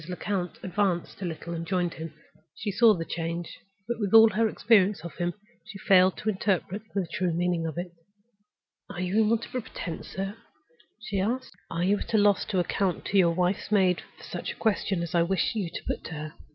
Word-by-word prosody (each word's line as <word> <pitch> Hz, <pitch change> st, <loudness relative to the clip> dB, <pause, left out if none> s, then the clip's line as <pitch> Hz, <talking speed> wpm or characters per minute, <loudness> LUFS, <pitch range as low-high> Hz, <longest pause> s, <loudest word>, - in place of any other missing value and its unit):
Lecount 180 Hz, 0 st, -3 dB
advanced 185 Hz, -1 st, -1 dB
a -, -, -2 dB
little 170 Hz, 0 st, -5 dB
and 165 Hz, 0 st, -3 dB
joined 175 Hz, 0 st, 0 dB
him. 160 Hz, 0 st, -7 dB, 0.4 s
She 215 Hz, -2 st, -3 dB
saw 220 Hz, +1 st, +6 dB
the 165 Hz, -2 st, -4 dB
change; 165 Hz, +1 st, -4 dB, 0.3 s
but, 235 Hz, -1 st, -2 dB
with 205 Hz, 0 st, +1 dB
all 225 Hz, 0 st, +10 dB
her 225 Hz, 0 st, +2 dB
experience 205 Hz, -4 st, +3 dB
of 170 Hz, -, -6 dB
him, 175 Hz, 0 st, -1 dB, 0.3 s
she 200 Hz, -, -10 dB
failed 190 Hz, -1 st, +4 dB
to 215 Hz, -, -2 dB
interpret 195 Hz, 0 st, -1 dB
the 195 Hz, -2 st, +1 dB
true 180 Hz, -2 st, 0 dB
meaning 170 Hz, 0 st, 0 dB
of 160 Hz, -, -6 dB
it. 175 Hz, 0 st, -4 dB, 1.0 s
"Are 200 Hz, -4 st, -7 dB
you 185 Hz, +4 st, +1 dB
in 215 Hz, -, +3 dB
want 230 Hz, 0 st, +1 dB
of -, -, -16 dB
a 255 Hz, -, -1 dB
pretense, 170 Hz, -6 st, -6 dB
sir?" 195 Hz, +3 st, -4 dB, 0.6 s
she 205 Hz, -3 st, -3 dB
asked. 245 Hz, +7 st, -1 dB, 0.2 s
"Are 170 Hz, -, -2 dB
you 200 Hz, +3 st, +2 dB
at -, -, -3 dB
a -, -, +6 dB
loss 205 Hz, -2 st, +4 dB
to 195 Hz, -, -2 dB
account 180 Hz, +1 st, 0 dB
to 200 Hz, -, +1 dB
your 170 Hz, -2 st, +4 dB
wife's 180 Hz, +3 st, 0 dB
maid 185 Hz, -4 st, +3 dB, 0.2 s
for -, -, -15 dB
such -, -, -5 dB
a -, -, -19 dB
question 200 Hz, -5 st, 0 dB
as 170 Hz, -, -5 dB
I 170 Hz, -, +4 dB
wish 190 Hz, +3 st, +1 dB
you 205 Hz, -6 st, -2 dB
to -, -, -7 dB
put -, -, -3 dB
to -, -, -6 dB
her? 155 Hz, +1 st, -6 dB
185 Hz, 220 wpm, -27 LUFS, 175-205 Hz, 1.0 s, all